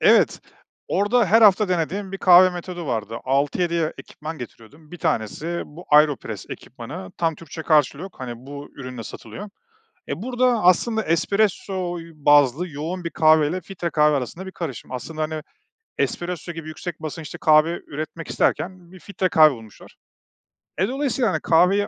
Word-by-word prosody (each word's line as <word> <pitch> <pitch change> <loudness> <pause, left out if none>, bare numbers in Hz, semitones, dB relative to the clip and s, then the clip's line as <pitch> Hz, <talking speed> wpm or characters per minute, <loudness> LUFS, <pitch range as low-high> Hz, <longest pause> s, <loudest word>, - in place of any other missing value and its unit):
Evet, - - +4 0.5
orada 215 +4 +2
her 225 +3 +5
hafta 210 -1 +6
denediğim 185 +3 -2
bir 195 - -4
kahve 185 0 +7
metodu 175 -1 -6
vardı. 115 -2 -3
6-7 145 +6 +1
ya 160 -2 0
ekipman 155 +1 -8
getiriyordum. 135 +6 -12
1 175 - -9
tanesi 155 +9 -2
bu 170 +4 -12
AeroPress 145 - +3
ekipmanı. 95 -1 -8
Tam 165 -1 +1
Türkçe 160 0 -9
karşılığı 150 -1 +2
yok, 190 0 -8
hani, 125 -2 -5
bu 140 +4 -9
ürünle 125 -3 -7
satılıyor. 205 - -9 0.6
Eee, - - -4
burada, 245 -1 +1
aslında, 220 +5 +3
espresso 185 0 0
y 165 0 -11
bazlı 145 +2 +4
yoğun 165 +5 -5
bir 170 - -2
kahveyle 155 +2 +3
filtre 175 -1 -5
kahve 150 -2 +3
arasında 150 +8 -5
bir 190 - -7
karışım. 155 - -6
Aslında, 155 +5 -5
hani, 155 0 -2 0.6
espresso 175 -1 -2
gibi 165 -1 -8
yüksek 160 +1 -6
basınçlı 155 0 -6
kahve 155 +2 +4
üretmek 155 +3 -6
isterken 180 -1 -1
bir 185 - -13
filtre 190 +2 -2
kahve 155 -2 +7
bulmuşlar. 110 -6 -12 0.8
E, 190 +5 +2
dolayısıyla, 265 -4 0
hani, - - -1
kahveyi 185 +5 +3
165 Hz, 155 wpm, -23 LUFS, 150-185 Hz, 0.8 s, kahve